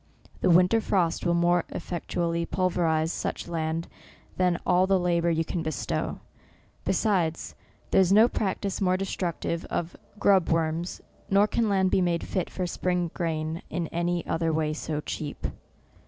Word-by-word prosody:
The 185 - +2
winter 180 +6 +5
frost 180 -4 +1
will 170 - +3
more 175 0 +3
effectually 170 -1 -2
pulverize 170 -3 +1
such - - -3
land 165 0 -2 0.5
than 180 -2 +2
all 185 +1 +4
the 195 0 +4
labour 170 -1 +1
you 165 -1 +1
can 170 - -3
bestow; 155 -5 -3 0.6
besides, 180 -6 0 0.4
there - - +6
is 185 -1 +2
no 215 +4 +7
practice 200 -3 -2
more 185 -1 +3
destructive 175 -3 -2
of 170 0 -3 0.2
grub 195 -4 +4
worms, 165 +1 -1 0.3
nor 200 +1 +5
can 220 +1 0
land 190 -2 +2
be - - +3
made 175 -2 +1
fit 185 -3 -2
for 185 - -3
spring 180 -1 -1
grain 160 -1 -2
in 175 -2 -2
any 175 0 -1
other 165 0 0
way 155 -1 0
so 155 -1 -3
cheap. 150 -1 -5
175 Hz, 155 wpm, -27 LUFS, 165-185 Hz, 0.6 s, no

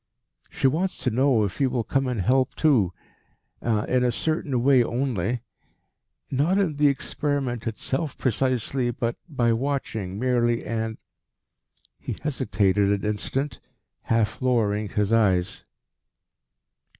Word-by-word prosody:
"She - - -3
wants 165 +8 +1
to 125 - +1
know 125 -1 +3
if 100 +6 -3
you 135 - +3
will 125 -2 -1
come 135 +3 0
and 125 -3 -2
help 130 +7 +2
too 125 - +3 0.7
in 120 +2 +1
a 125 - +2
certain 140 -2 -1
way 130 -2 +5
only: 120 -2 -1 0.9
not 150 +8 +2
in 175 -8 +1
the 150 0 +4
experiment 140 -3 -1
itself 135 +6 -3
precisely, 130 0 0
but 120 0 -2
by 120 -6 +2
watching 115 -7 -2
merely 120 -1 +1
and 110 -1 -3 0.5
" - - -34
He - - -4
hesitated 105 -9 +1
an 100 0 0
instant, 125 +6 -2 0.5
half 115 -1 0
lowering 110 -5 +1
his 105 +1 0
eyes. 95 -4 +1
120 Hz, 125 wpm, -25 LUFS, 110-135 Hz, 0.9 s, way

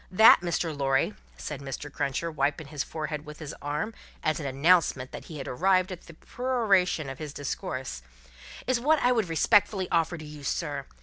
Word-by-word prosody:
That, 220 +2 +8
Mr. 170 -2 -1
Lorry," 135 +7 +1 0.2
said 145 -2 -6
Mr. 140 +1 -6
Cruncher, 150 +5 -1
wiping 150 +1 0
his 145 -2 -2
forehead 155 -1 -4
with 150 -1 -10
his 155 -3 -7
arm, 150 +10 -2 0.3
as 155 +1 +1
an 145 - -3
announcement 140 -2 +3
that - - -8
he 155 - -8
had 135 - -6
arrived 185 +6 +2
at 180 - -8
the 170 - -12
peroration 200 - +1
of 135 -1 -7
his 150 -2 -6
discourse, 130 - -4 0.6
"is 255 -1 +2
wot 305 +6 +4
I 250 - +5
would 225 -7 +1
respectfully 190 +3 +3
offer 170 0 +2
to 155 - -9
you, 150 -1 -10
sir. 145 -1 -2
155 Hz, 185 wpm, -28 LUFS, 145-185 Hz, 0.6 s, That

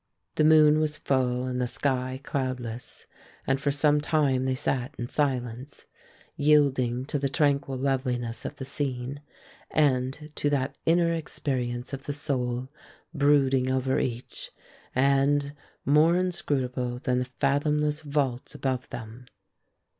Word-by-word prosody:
The - - +2
moon 155 -1 +6
was 155 -1 -1
full 130 -3 0
and 125 0 -2
the 125 - 0
sky 130 0 -1
cloudless, 125 -4 -4 0.4
and 135 0 0
for 145 - +1
some 145 +1 +3
time 145 -4 +1
they 130 0 +1
sat 130 +2 -1
in 120 +1 -4
silence, 130 -2 -2 0.5
yielding 135 -4 +3
to 145 - -2
the 140 0 0
tranquil 140 -2 +1
loveliness 125 -3 -1
of - - -5
the 135 - -7
scene 135 0 -3 0.5
and 145 +1 +1
to 145 - 0
that 140 -2 -1
inner 170 0 +4
experience 130 -6 -3
of 135 0 -6
the 145 - -1
soul 130 -4 -2 0.4
brooding 140 -3 +3
over 130 0 +1
each, 120 0 -4 0.5
and 140 +2 +2 0.3
more 155 +4 +5
inscrutable 130 -9 -1
than 125 0 0
the 125 - -1
fathomless 150 +2 +1
vault 140 -4 -2
above 130 -2 -2
them. 115 +2 -9
135 Hz, 130 wpm, -27 LUFS, 125-145 Hz, 0.5 s, moon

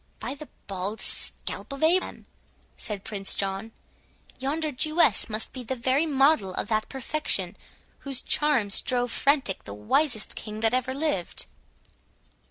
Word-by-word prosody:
"By - - -3
the 295 +1 -10 0.2
bald 195 +2 -3
scalp - - -1
of 275 +2 -4
Abraham," 355 +4 +2 0.5
said 210 -4 -4
Prince 200 -2 -2
John, 195 +3 -2 0.7
"yonder 300 +4 -1
Jewess 305 - +3
must 215 0 -2
be 255 - -6
the 260 +3 -3
very 260 +6 +2
model 270 -9 +3
of - - -3
that 215 -1 0
perfection, 280 +3 -1 0.4
whose 270 -3 -1
charms 265 -10 +3
drove 245 -1 0
frantic 275 -9 +2
the 100 - -7
wisest 220 - +2
king 215 0 -6
that 225 +1 +3
ever 255 +1 0
lived! 280 - 0
255 Hz, 140 wpm, -27 LUFS, 210-285 Hz, 0.7 s, Jewess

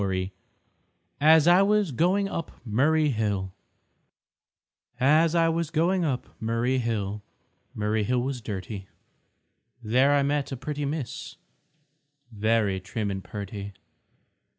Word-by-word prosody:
_ 95 -1 -1 0.9
AS 155 0 +6
I 175 +2 +7
WAS 205 -3 +2
GOING 185 - +2
UP 165 -4 -4 0.2
MURRAY 150 +7 +2
HILL 100 -6 -1 1.5
As 155 +5 +4
I 165 -1 +4
was 165 -1 0
going 170 +3 +1
up 135 -6 -2
Murray 115 +3 0
Hill, 105 -3 -2 0.5
Murray 105 +1 0
Hill 125 +3 0
was 130 -2 -3
dirty; 100 -1 -6 1.0
There 125 +6 +3
I 140 - +3
met 145 0 -1
a 135 - -4
pretty 145 +3 -4
Miss, 140 -3 -5 1.0
Very 110 -2 +1
trim 100 +2 -3
and 95 -1 -5
perty. 100 -1 -7
125 Hz, 120 wpm, -26 LUFS, 105-155 Hz, 1.5 s, I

